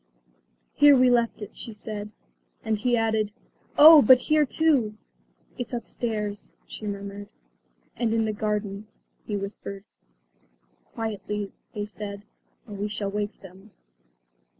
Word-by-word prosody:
"Here 290 -1 +7
we 255 0 +5
left 235 -3 +1
it," 205 - -10
she 230 - -7
said. 210 0 -6 0.5
And 220 -1 -1
he 240 +2 +2
added, 220 -2 0 0.5
"Oh, 310 0 +10
but 255 +2 +7
here 305 0 +2
too!" 270 -9 +2 0.6
"It's 245 0 -5
upstairs," 215 -3 -4
she 215 - -8
murmured. 200 0 -6 0.7
"And 235 -2 -1
in 225 0 +1
the 215 - -1
garden," 210 -1 -3 0.4
he 210 - -2
whispered. 200 0 -6 1.0
"Quietly," 210 -2 -5 0.2
they 205 -1 -3
said, 205 -1 -8 0.4
"or 210 - -9
we 200 +1 -3
shall 205 -1 -3
wake 210 +1 -4
them." 190 +2 -14
215 Hz, 125 wpm, -26 LUFS, 205-235 Hz, 1.0 s, Oh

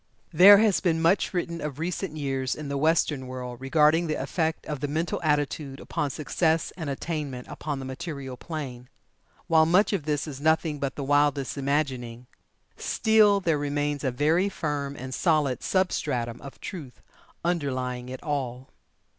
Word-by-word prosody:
There 195 +5 +10
has 210 -2 +3
been 165 -3 +1
much 165 +5 +2
written 170 -2 -3
of 150 -3 -4
recent 170 0 -3
years 135 -3 -1
in 150 -2 -6
the 140 - -2
Western 150 -3 +1
world 125 -1 -7
regarding 155 +4 +3
the 155 - -1
effect 160 +4 -2
of 150 -3 -4
the 145 - -2
Mental 160 +4 -2
Attitude 145 -2 -1
upon 145 - -2
Success 160 +3 0
and 160 -5 -5
attainment 140 -3 -4
upon 150 -2 -4
the 135 - -6
material 135 -1 -6
plane. 125 -4 -7 0.6
While 160 -1 +4
much 190 +5 +4
of 175 -7 -1
this 150 -2 0
is 140 -3 -7
nothing 160 -1 +1
but 140 -1 -2
the 140 - -4
wildest 145 -1 +2
imagining, 135 -4 -2 0.5
still 215 -2 +3
there 165 -5 +1
remains 145 0 -1
a 135 - +1
very 155 +9 +2
firm 145 -6 -3
and 130 0 -7
solid 150 -7 +1
substratum 130 -11 -1
of 140 - -10
truth 150 -10 -8 0.4
underlying 130 -7 -2
it 130 0 -7
all. 130 -4 -3
145 Hz, 160 wpm, -26 LUFS, 135-165 Hz, 0.6 s, There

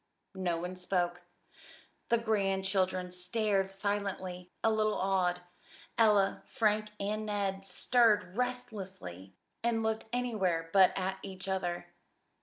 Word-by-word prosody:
No 185 -3 -1
one 180 +2 -4
spoke. 175 -1 -1 0.9
The 235 - +5
grandchildren 190 -4 0
stared 195 +2 0
silently, 195 -2 -3
a 225 - +4
little 215 -1 +2
awed. 185 -2 +1 0.5
Ella, 210 -3 +4
Frank, 215 -1 +1
and 210 +2 -1
Ned 195 -2 -1
stirred 210 -5 +3
restlessly 195 - -4 0.3
and 230 -1 +1
looked 220 0 -1
anywhere 195 -10 0
but 190 -2 +7
at 190 0 -2
each 190 -1 -7
other. 180 -2 -2
195 Hz, 110 wpm, -32 LUFS, 180-215 Hz, 0.9 s, but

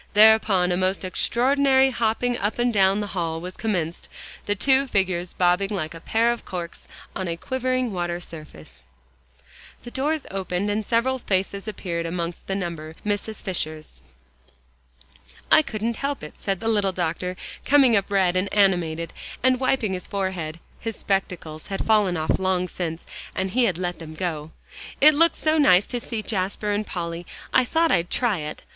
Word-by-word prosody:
Thereupon 210 -4 +6
a 175 - +1
most 185 +1 0
extraordinary 265 +6 +3
hopping 240 +1 0
up 210 -2 -2
and 240 0 +1
down 195 0 +3
the - - -2
hall 165 -3 -2
was 180 +2 -7
commenced, 175 -7 -2 0.4
the 205 - +1
two 270 +5 +3
figures 185 -5 0
bobbing 180 +2 +2
like 170 -6 -3
a 165 - -9
pair 230 +7 +2
of 240 - -9
corks 175 -2 -7 0.3
on 190 - -3
a 170 0 -3
quivering 255 +1 -1
water 175 -1 -2
surface. 80 - -11 1.0
The 240 - -8
doors 295 +3 -1
opened, 190 +1 -2
and 215 +1 -1
several 245 +4 +1
faces 195 -1 -2
appeared, 170 -5 -3
amongst 170 0 -4
the 195 - -1
number 165 -4 -5
Mrs. 210 +1 -2
Fisher's. 155 -5 -4 1.5
"I - - +8
couldn't 225 -4 -3
help 280 - -3
it," 150 - -8
said 195 -2 -3
the 225 - -2
little 205 -3 +2
doctor, 180 +1 -2 0.3
coming 270 -4 +5
up 200 -1 +1
red 190 -3 +2
and 185 +2 0
animated, 170 -5 +2 0.3
and 255 -1 +4
wiping 255 -6 +1
his 180 - -4
forehead. 185 -5 -3 0.2
His 225 -1 -4
spectacles 180 -5 -3
had 195 - -3
fallen 210 -5 +3
off 155 +3 0
long 185 -1 +1
since, 170 -2 -5 0.3
and 190 0 -1
he 250 +2 +3
had 185 -7 0
let 175 -1 -3
them 160 -1 -9
go. 155 -3 -3 0.5
"It 305 +2 +8
looked 330 +3 +4
so 310 0 +1
nice 195 -9 +6
to 245 - -3
see 230 -2 -4
Jasper 200 +1 -1
and 205 +1 -1
Polly, 170 -1 -4 0.3
I - - +6
thought 325 +5 +2
I'd 175 -1 +2
try 235 -7 +1
it. 150 0 -6
195 Hz, 170 wpm, -24 LUFS, 175-230 Hz, 1.5 s, I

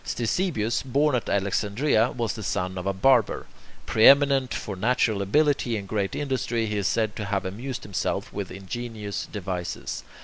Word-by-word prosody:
Ctesibius, 120 - -1
born 140 +3 +1
at 125 - -1
Alexandria, 110 +5 +1
was 115 -5 -2
the 110 - -7
son 95 -2 -2
of 90 - -5
a - - +2
barber. 115 +4 +3 0.4
Preeminent 135 +2 +5
for 100 - -4
natural 110 0 +1
ability 130 +2 +2
and 100 -1 -6
great 100 -1 -1
industry, 125 -5 -1
he 105 -1 -2
is 100 - 0
said 110 -2 0
to 105 - -3
have 100 -2 -1
amused 115 +8 -5
himself 100 -3 -3
with 100 -2 -4
ingenious 105 +2 -5
devices. 90 -3 -4
110 Hz, 160 wpm, -25 LUFS, 100-125 Hz, 0.4 s, Preeminent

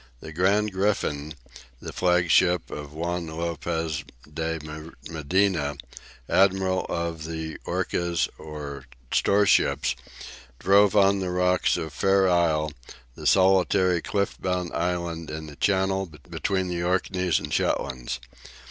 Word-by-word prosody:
The 80 - -9
"Gran 100 +5 +2
Grifon," 80 -7 -1 0.4
the - - -8
flagship 90 0 +3
of 75 -1 -7
Juan 85 +2 -3
Lopez 80 -1 -3 0.3
de 80 +1 -2 0.5
Medina, 80 -1 +1 0.5
admiral 95 -1 +2
of 85 -2 -3
the 80 -1 -5
urcas 85 -4 0
or 75 -3 -7 0.3
storeships, 100 0 +3 0.6
drove 100 +5 +4
on 100 -1 +5
the 95 -1 -2
rocks 90 0 +2
of 80 -2 -5
Fair 95 +3 +3
Isle, 80 -4 +2 0.4
the - - -4
solitary 95 -1 +4
cliff 100 +2 -2
bound 90 -2 -2
island 85 -2 -2
in 80 0 -5
the 75 -2 -10
channel 95 +1 +1 0.2
between 95 +3 -1
the 85 -1 -2
Orkneys 90 0 +1
and 75 +1 -4
Shetlands. 60 -2 -1
85 Hz, 115 wpm, -25 LUFS, 80-95 Hz, 0.6 s, on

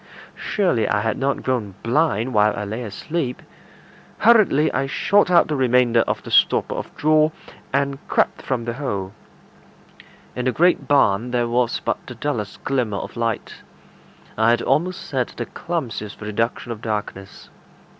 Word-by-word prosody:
Surely 175 - 0
I 105 - +1
had 110 0 -1
not 135 +1 -1
grown 115 -7 -2
blind 125 -2 +1
while 105 0 +3
I 105 - -2
lay 110 +4 -4
asleep. 125 +5 -4 0.8
Hurriedly 205 -10 +4
I 135 - 0
shot 200 +7 +2
out 175 -1 +5
the 150 - -1
remainder 125 -3 +3
of - - -2
the - - -9
stopper - - +3
of - - -5
straw, 155 0 +4 0.4
and 140 0 0
crept - - +1
from 125 -3 -2
the 120 - -2
hole. 100 -8 -4 1.2
In 125 - -3
the 130 - +2
great 175 +6 +2
barn 120 -5 +3
there 120 -1 0
was 120 0 0
but - - -2
the 125 - -8
dullest 115 -5 -4
glimmer 125 -7 -1
of - - -7
light; 115 -1 -3 0.8
I 110 +1 +4
had 120 0 +2
almost 180 +4 0
said 130 -3 -1
the 120 - -3
clumsiest 120 -10 -5
reduction 115 +3 -2
of 110 -2 -6
darkness. 105 -3 -5
125 Hz, 155 wpm, -21 LUFS, 110-145 Hz, 1.2 s, out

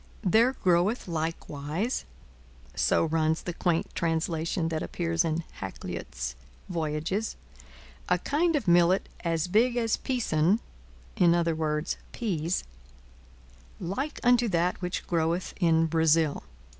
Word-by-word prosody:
'There 225 +7 +4
groweth 185 +3 +1
likewise,' 160 - -3 0.7
so - - +2
runs 160 0 +1
the 175 - -4
quaint 170 -1 0
translation 165 0 -1
that 160 -1 -2
appears 165 -1 0
in 165 0 -1 0.2
Hakluyt's 60 -9 -5 0.3
'Voyages,' 165 +5 -2 0.7
'a - - +4
kind 330 +3 +1
of 275 -9 -1
Millet 175 +2 +4 0.2
as 165 -2 0
big 235 +6 +3
as 230 -2 +1
peason 200 -7 +1 0.6
[i.e. 165 -3 +2 0.3
peas] 175 -7 -1 1.2
like 270 - -3
unto 245 -1 +4
that 175 0 0
which 180 0 -3
groweth 170 +1 0
in 165 -2 +4
Bresil.' 160 -1 +2
170 Hz, 105 wpm, -28 LUFS, 160-195 Hz, 1.2 s, There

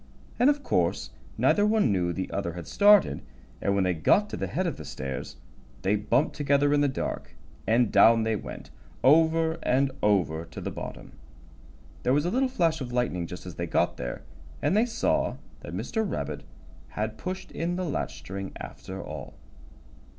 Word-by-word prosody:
And 250 - +6
of 290 -1 +1
course - - 0 0.3
neither 205 - +3
one 210 - +3
knew 90 -3 +1
the 95 +2 -4
other 95 -4 -2
had 85 0 -7
started, 205 -1 +5 0.4
and 100 - +1
when 100 - +2
they 90 -1 +2
got 200 - +3
to - - -3
the - - -3
head 185 - -1
of 170 - -2
the 75 - -8
stairs 65 -2 -6 0.5
they 100 +2 +3
bumped 120 +8 +1
together 145 0 +2
in 145 - +3
the 145 - +4
dark, 130 - -4 0.3
and 115 0 +3
down 115 0 +6
they 110 0 +1
went, - - -8 0.3
over 160 +3 +4
and 135 +2 +2
over, 90 -6 +2
to 80 - -10
the - - -4
bottom. - - -8 0.9
There 125 - +2
was 145 +3 +2
a 175 - 0
little 260 +2 +2
flash 165 - +1
of 125 -2 -5
lightning 115 -9 -1
just 90 - -8
as 90 - -7
they 85 - -2
got - - +1
there, 60 0 -5 0.4
and - - +1
they 225 +3 +3
saw 230 - 0 0.2
that - - -8
Mr. 220 - -1
Rabbit 200 - -4 0.4
had 110 +1 -4
pushed 185 +1 -5
in 170 +2 -2
the 185 0 -2
latch 150 - -3
string 95 +1 -6
after 95 +1 -7
all. 75 -3 -8
125 Hz, 185 wpm, -27 LUFS, -, 0.9 s, And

